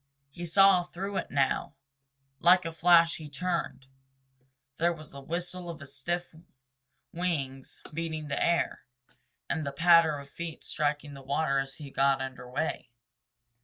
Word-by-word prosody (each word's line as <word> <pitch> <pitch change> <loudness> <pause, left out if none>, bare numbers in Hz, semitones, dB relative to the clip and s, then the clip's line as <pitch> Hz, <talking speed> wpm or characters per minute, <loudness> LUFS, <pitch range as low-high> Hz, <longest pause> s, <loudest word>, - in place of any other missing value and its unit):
He 175 +4 -6
saw 195 +1 +6
through 190 +3 -5
it - - -3
now. 140 -2 0 0.6
Like 180 +1 +5
a 165 - -3
flash 170 0 +5
he 155 -2 -9
turned. 165 -2 -3 0.9
There 170 +1 +3
was 155 -2 -9
the 140 - -9
whistle 175 +4 -4
of 155 -4 -8
stiff 170 +7 -4 0.8
wings 140 -7 -3 0.2
beating 160 -1 -3
the 140 - -1
air 170 0 +1 0.7
and 160 - -1
the 140 - -3
patter 165 +1 +5
of 140 -1 -9
feet 165 -2 -7
striking 145 -1 -2
the 135 - -10
water 140 +1 +1
as 135 0 -4
he 145 -3 -10
got 135 0 +3
under 130 -2 -6
way. 125 -1 -2
160 Hz, 145 wpm, -29 LUFS, 140-170 Hz, 0.9 s, saw